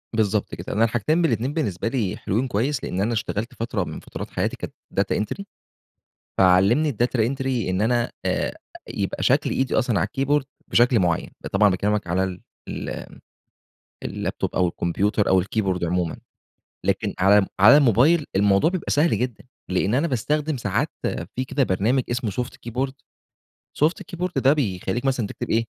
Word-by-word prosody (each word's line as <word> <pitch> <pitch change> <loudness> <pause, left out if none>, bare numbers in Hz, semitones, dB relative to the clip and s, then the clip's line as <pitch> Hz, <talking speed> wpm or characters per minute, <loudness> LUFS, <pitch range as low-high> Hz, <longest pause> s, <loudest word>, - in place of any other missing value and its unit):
بالضبط 105 -2 0
كده، - - -6
أنا 110 - +3
الحاجتين 120 +9 +1
بالإتنين 130 -3 0
بالنسبة 115 - -2
لي 115 -7 -1
حلوين، 115 +7 -1
كويِس 130 +5 -1
لأني 95 +2 -1
أنا 115 +3 0
اشتغَلت 110 +1 -3
فترة 115 -4 -2
من - - -6
فترات - - -8
حياتي - - -1
كانت - - -7 0.3
data - - +1
entry. 110 - -3 0.9
فعلَّمني 95 +11 +4
الdata 120 +1 0
entry 130 -1 0
إن 95 +2 0
أنا 120 +1 +1
آآ، - - -1 0.3
يبقى - - -3
شكل - - +3
إيدي 130 -1 0
أصلًا 120 -6 +2
على 80 - +1
الkeyboard 140 +1 +1 0.2
بشكل 120 -1 +4
معيَّن. 85 -3 0
ده - - -6
طبعًا 105 +1 +4
باكلِّمك 100 +2 0
على 90 +2 +1 0.5
ال - - -5 1.0
الlaptop - - -3
أو 90 -1 +3
الكمبيوتر 100 +5 0
أو 95 -1 +4
الkeyboard 95 -3 -1
عمومًا، 85 -1 -1 0.7
لكن - - 0
على 100 +1 +5
على 115 +8 +9
الموبايل 145 - +4
الموضوع 100 - +4
بيبقى 185 -3 -3
سهل 155 +3 +3
جدًا 125 -3 -3 0.3
لإن 95 +4 +1
أنا 145 +6 +2
باستخدِم 150 +3 -1
ساعات 105 -5 -1 0.5
في 130 - 0
كده 135 +1 0
برنامج 115 +7 +1
اسمه 120 -2 -1
Soft 125 +6 -3 0.2
Keyboard. 130 +3 -2 0.9
Soft 160 +3 +1
Keyboard 180 +1 -2
ده 135 - +5
بيخلِّيك 120 -3 -1
مثلًا 130 -5 +1
تكتب - - -6
إيه، 115 +1 +2
115 Hz, 160 wpm, -23 LUFS, 100-135 Hz, 1.0 s, على